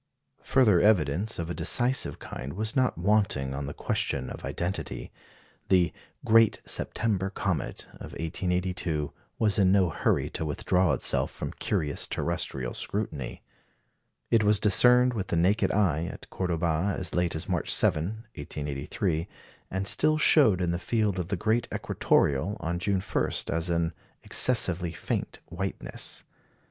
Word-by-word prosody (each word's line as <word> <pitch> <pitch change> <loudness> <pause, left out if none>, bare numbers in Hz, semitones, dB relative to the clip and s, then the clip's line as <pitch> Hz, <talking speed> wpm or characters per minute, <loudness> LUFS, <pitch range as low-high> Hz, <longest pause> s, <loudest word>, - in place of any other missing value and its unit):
Further 110 -9 +4
evidence 100 0 +2
of 85 0 -4
a - - -2
decisive 125 +8 +2
kind 65 - -7
was 110 +4 -2
not 130 - +2
wanting 90 -8 +1
on 70 0 -4
the - - -4
question 65 -2 -2
of - - -8
identity. 90 +3 -3 0.6
The 90 -3 +3 0.3
"Great 115 0 +5
September 100 -4 0
Comet" 95 -5 -3
of - - -10
1882 90 -2 -2 0.2
was 105 -1 +2
in 95 -2 +4
no 95 -4 +3
hurry - - 0
to - - -4
withdraw 85 +2 +1
itself - - +1
from - - -5
curious 75 -2 -2
terrestrial 60 -3 -2
scrutiny. 80 - -4 0.9
It 115 -2 +4
was 105 -1 +4
discerned 125 +4 +5
with 100 -5 -3
the - - -1
naked 95 +6 +2
eye 85 -6 +1
at - - -9
Cordoba 85 +1 0
as 90 - -3
late 90 -2 0
as 80 - -4
March - - -1
7, 105 +9 +1
1883, 75 +4 -3 0.4
and 95 +1 -2
still 155 +7 +3
showed 125 - +5
in 90 -1 0
the 85 - -2
field 105 -2 0
of 85 - -3
the 100 - -1
great 110 +6 0
equatoreal 75 +9 +1
on 85 +2 -2
June 95 0 0
1 - - -1 0.2
as 80 +1 -1
an 85 -1 0 0.3
"excessively 90 -8 +2
faint - - -4
whiteness." 95 +3 -5
90 Hz, 145 wpm, -27 LUFS, 80-105 Hz, 0.9 s, Great